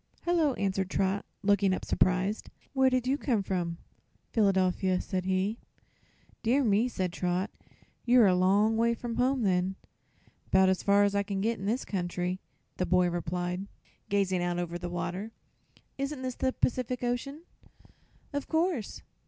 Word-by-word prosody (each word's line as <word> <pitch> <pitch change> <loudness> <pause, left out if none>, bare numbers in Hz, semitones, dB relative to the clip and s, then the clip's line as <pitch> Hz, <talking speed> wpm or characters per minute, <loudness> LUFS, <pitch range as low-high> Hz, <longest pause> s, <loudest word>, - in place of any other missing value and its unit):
"Hello," 330 -6 +2
answered 195 -1 -1
Trot, 195 +1 0 0.2
looking 200 -1 +3
up - - -6
surprised. 185 +3 +1 0.2
"Where 265 -1 +4
did 255 -1 0
you 270 +3 +1
come 230 -7 0
from?" 175 -3 -2 0.5
"Philadelphia," 190 -3 +2
said 185 -1 -3
he. 190 +4 0 0.8
"Dear 260 +5 +2
me," 220 +1 +3
said 185 -6 -2
Trot; 180 +4 -1 0.5
"you're 245 -1 +6
a 190 - +5
long 200 +5 +3
way 235 +1 +2
from 230 -1 -5
home, 255 0 +2
then." 185 -1 +1 0.7
"'Bout 190 0 +5
as 190 - +1
far 200 0 +4
as 200 0 +2
I 200 - +2
can 200 -1 -3
get, 225 +3 0
in 195 - -5
this 235 +5 0
country," 180 -1 -2 0.4
the 180 - -1
boy 180 -1 +3
replied, 175 +2 -3 0.4
gazing 195 -3 +1
out 175 0 -1
over 175 0 -3
the 175 0 -4
water. 180 +5 -4 0.7
"Isn't 275 -1 -3
this 255 -1 -2
the 260 +1 0
Pacific 250 -1 -1
Ocean?" 275 +6 -2 0.9
"Of 285 -1 -3
course." 320 - -1
200 Hz, 155 wpm, -29 LUFS, 185-240 Hz, 0.9 s, you're